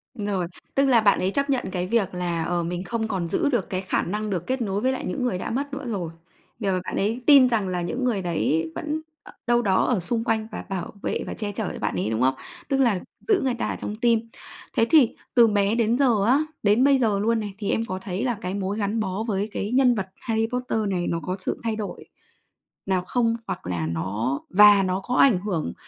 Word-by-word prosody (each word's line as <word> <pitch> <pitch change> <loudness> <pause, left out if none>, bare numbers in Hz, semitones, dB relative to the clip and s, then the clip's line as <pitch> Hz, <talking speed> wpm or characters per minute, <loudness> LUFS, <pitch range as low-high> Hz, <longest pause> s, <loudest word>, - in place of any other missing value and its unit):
Rồi, 205 -5 -2 0.3
tức 275 0 +4
là 245 -4 +5
bạn 205 -2 +4
ấy 190 +1 0
chấp 280 +3 0
nhận 265 -3 +1
cái 180 -1 -2
việc 200 -3 +1
là, 175 -2 -1
ờ, 175 +1 -1
mình 175 +2 -3
không 225 +1 -2
còn 185 -5 -2
giữ 285 - +1
được 240 -8 -1
cái 185 0 -2
khả 185 - 0
năng 210 +3 -3
được 180 -4 -3
kết 260 0 -1
nối 205 -2 -1
với 260 - +2
lại 260 - -4
những 270 - -3
người 245 -7 0
đã - - -4
mất 275 +4 -3
nữa 275 -1 -5
rồi. 190 -8 -3 0.5
Vì, 205 - -2
ờ, 185 -1 +1
bạn - - -5
ấy 225 +5 0
tin 275 -4 +8
rằng 215 -5 0
là 180 -1 -2
những 245 +9 -3
người 230 -6 +1
đấy 160 -2 0
vẫn 310 +1 -3 0.2
ở - - -13 0.2
đâu 240 0 +4
đó 195 -5 +2
ở 240 -6 +1
xung 225 +6 -2
quanh 220 -2 0
và - - -6
bảo 190 -2 -4
vệ - - -2
và - - -4
che 210 -2 -3
chở 205 0 -3
cho - - -7
bạn 105 - -2
ấy, 95 +3 -1
đúng 110 +1 -1
không? 130 +1 +4 0.4
Tức 275 - +2
là 235 -8 +3 0.3
giữ 415 -4 +3
người 260 -2 +1
ta 240 - -2
ở - - -2
trong 210 - -4
tim. 230 0 +1 0.5
Thế 225 - +5
thì 290 -8 +5 0.2
từ 235 -1 +7
bé 205 0 +2
đến 230 0 +2
giờ 240 -7 +3
á, 255 +5 +4 0.2
đến 210 +4 +4
bây 275 -1 +5
giờ 215 -5 +2
luôn 225 +2 +1
này, 205 -2 -5
thì 205 -2 -3
em 225 - +1
có 185 -3 -4
thấy 190 0 -3
là 245 -2 0
cái 180 +1 -3
mối 200 +1 -2
gắn 210 +1 -1
bó 200 0 -2
với 205 0 -1
cái 205 +1 -3
nhân 250 -1 +4
vật 195 -3 -3
Harry 225 -1 0
Potter 250 -2 -1
này 180 -3 -1
nó 170 - -1
có 185 - -2
sự 190 - -3
thay 225 -1 -1
đổi 215 -2 -6 0.8
nào 190 -2 0
không 230 0 +1
hoặc - - -5
là 85 -3 -2
nó 100 - -2
và 205 0 +7
nó 185 0 0
có 250 +4 -2
ảnh 240 -10 +5
hưởng 180 - -3
210 Hz, 255 wpm, -24 LUFS, 185-240 Hz, 0.8 s, tin